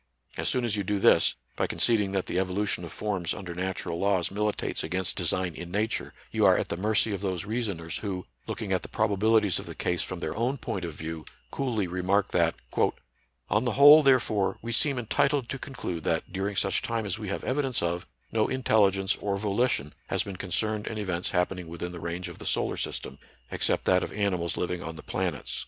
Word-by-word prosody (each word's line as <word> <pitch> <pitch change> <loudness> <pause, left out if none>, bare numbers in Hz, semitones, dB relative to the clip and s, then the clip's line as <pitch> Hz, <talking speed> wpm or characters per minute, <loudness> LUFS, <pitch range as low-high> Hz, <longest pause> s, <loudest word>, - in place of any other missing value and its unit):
As - - -1
soon 125 -2 +1
as 110 -3 0
you 100 - -1
do 105 +2 0
this, - - +5 0.2
by - - 0
conceding 105 -4 +2
that 95 -1 0
the 90 - -1
evolution 95 0 -1
of 85 - -7
forms 95 -6 -2
under 90 -2 -6
natural 90 -1 -3
laws 100 -3 +2
mili 105 +1 0
tates - - -3
against 95 0 0
design 90 -2 0
in 85 +1 -7
Nature, 105 +5 -1 0.2
you - - +1
are - - +6
at - - -2
the - - -1
mercy 105 +4 +1
of 100 - -3
those 95 -3 -2
reasoners, 100 -8 -3
who, 95 -3 -4 0.2
looking 105 -4 -2
at 95 - +1
the - - -8
probabilities 110 -1 +2
of - - -8
the - - -7
case 90 -1 0
from 90 - -4
their 80 -2 -3
own 120 +5 0
point 95 -8 -4
of 85 -3 -6
view, 80 0 -5 0.3
coolly 120 -7 -1
remark 90 +3 +1
that: 85 -1 +2 0.3
— - - -13
" - - -43
On 105 +3 +3
the 120 -3 0
whole, 145 +4 +9
therefore, 125 -8 +3
we 120 - -3
seem 135 +4 +3
entitled 140 +3 +1
to 135 - -3
conclude 100 - -5
that, - - -1
during 100 +1 -2
such 95 - +1
time 115 -2 -2
as 100 +2 -2
we 105 - -5
have 100 - -3
evidence 130 -6 0
of, 85 +1 -2 0.2
no 110 -1 +2
intelligence 100 -6 +2
or 100 -1 -1
volition 100 - 0
has - - +1
been 100 - -6
concerned 105 +4 -1
in 110 - -3
events 90 -4 -2
happening 90 -1 -1
within 85 +1 -5
the 90 - -7
range 85 +2 -4
of - - -10
the - - -6
solar - - +1
system, 65 - -4 0.3
except - - +1
that 90 0 +4
of - - -4
animals 95 -5 0
liv 90 - -1
ing 90 -1 -3
on 80 0 -6
the 80 - -10
planets." 90 -7 -2
100 Hz, 215 wpm, -28 LUFS, 90-110 Hz, 0.3 s, whole